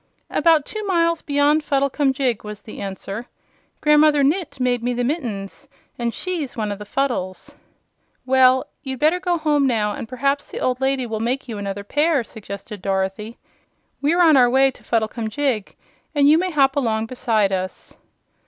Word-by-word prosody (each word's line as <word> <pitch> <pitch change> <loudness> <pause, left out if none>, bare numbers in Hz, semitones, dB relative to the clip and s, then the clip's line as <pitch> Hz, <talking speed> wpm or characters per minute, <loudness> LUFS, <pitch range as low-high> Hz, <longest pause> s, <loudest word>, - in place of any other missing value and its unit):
"About 315 -2 +3
two 430 -1 -5
miles 335 -3 +2
beyond 290 +1 +2
Fuddlecumjig," 275 -3 0
was 210 -1 -8
the 215 - -9
answer. 195 +4 -6 0.5
"Grandmother 300 -1 +5
Gnit 295 -1 0
made 250 -1 +1
me 245 +1 -1
the 245 - -1
mittens, 240 - -4 0.3
and 235 -1 0
she's 325 -4 -4
one 215 -2 -2
of 205 - -5
the 210 - -8
Fuddles." 200 -7 -3 0.7
"Well, 260 0 +4 0.2
you'd 265 -1 -5
better 315 +5 +3
go 355 -1 0
home 295 -3 +2
now, 215 -4 +1
and 220 - -6
perhaps 275 +2 -1
the - - -6
old 255 0 -1
lady 265 -1 +1
will 220 -2 -4
make 250 +4 -2
you 220 -4 -5
another 200 0 -4
pair," 295 +4 +1
suggested 205 -2 -9
Dorothy. 195 +4 -2 0.6
"We're 335 +5 +3
on 315 -4 +6
our 245 -2 +6
way 265 +2 +4
to - - -19
Fuddlecumjig, 225 +1 -1 0.4
and 285 -1 +4
you 310 +2 +6
may 370 +1 -1
hop 275 -5 +2
along 225 -5 0
beside 225 -4 0
us." 185 -1 -4
260 Hz, 165 wpm, -21 LUFS, 220-290 Hz, 0.7 s, on